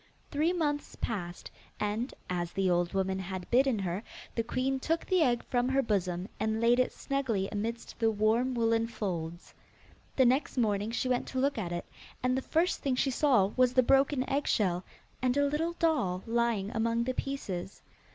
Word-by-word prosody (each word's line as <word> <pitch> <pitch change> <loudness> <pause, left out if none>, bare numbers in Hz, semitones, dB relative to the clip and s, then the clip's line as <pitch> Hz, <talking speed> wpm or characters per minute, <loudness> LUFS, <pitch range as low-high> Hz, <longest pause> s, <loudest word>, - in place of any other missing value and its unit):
Three 310 +4 +2
months 295 -5 -1
passed, 175 -6 -4 0.3
and, 210 +5 -1 0.2
as 175 -1 -2
the 190 -2 +1
old 175 0 +1
woman 190 0 0
had 185 -1 -5
bidden 260 -1 +4
her, 190 0 -2 0.3
the 230 - 0
queen 255 +3 -1
took 325 +5 -1
the 370 -2 +2
egg 245 -5 +2
from 245 0 0
her 270 +1 +2
bosom, 185 -4 -1
and 220 0 0
laid 235 +2 +4
it 255 - +2
snugly 250 -9 -1
amidst 230 +3 -4
the 225 -1 +3
warm 225 +4 +2
woollen 230 -1 +2
folds. 175 -6 -5 0.6
The 260 - +5
next 260 +3 +2
morning 210 -3 +1
she 245 +2 -1
went 250 -1 0
to 260 - -3
look 275 -2 +1
at 175 -5 -3
it, 175 0 -3 0.4
and 255 0 +2
the 265 - 0
first 335 +6 +1
thing 270 -2 0
she 270 +1 +1
saw 245 -8 +3
was 255 -1 +3
the 255 - +6
broken 270 +1 +3
eggshell, 200 -10 +1 0.4
and 255 +1 +1
a 285 - +4
little 310 +4 0
doll 265 - +1
lying 230 -3 0
among 230 +1 +1
the 255 +2 -1
pieces. 200 -10 -4
235 Hz, 180 wpm, -30 LUFS, 195-265 Hz, 0.6 s, the